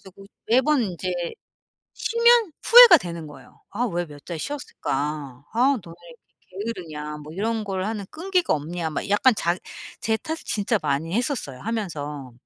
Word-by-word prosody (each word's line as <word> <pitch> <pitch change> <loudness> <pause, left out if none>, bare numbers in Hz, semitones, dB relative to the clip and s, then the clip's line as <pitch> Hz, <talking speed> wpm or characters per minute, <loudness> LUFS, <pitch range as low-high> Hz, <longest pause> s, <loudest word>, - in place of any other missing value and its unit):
그래가지고 195 +1 -15 0.2
매번 260 +3 +3
이제 185 -2 -4 0.9
쉬면 465 -5 +3
후회가 475 -7 +10
되는 170 - -7
거예요. 150 - -15
'아 235 +4 -1
왜 175 -5 -2
몇 145 -1 -13
달 170 -3 -5
쉬었을까? 145 - -4
아 255 +3 +3
너 170 - -12
왜 - - -10 0.7
이렇게 230 +2 -2
게으르냐? 150 -3 -7
뭐 150 +1 -10
이런 220 +4 -2
걸 190 -2 -3
하는 210 -2 -4
끈기가 360 +1 0
없냐?' 160 +3 -3
막 150 - -4
약간 230 +5 +4
자 170 -3 0 0.4
제 220 0 +1
탓을 320 +6 -5
진짜 210 +1 0
많이 150 +2 -1
했었어요 235 - -2
하면서. 150 - -4
195 Hz, 320 characters per minute, -24 LUFS, 155-245 Hz, 0.9 s, 후회가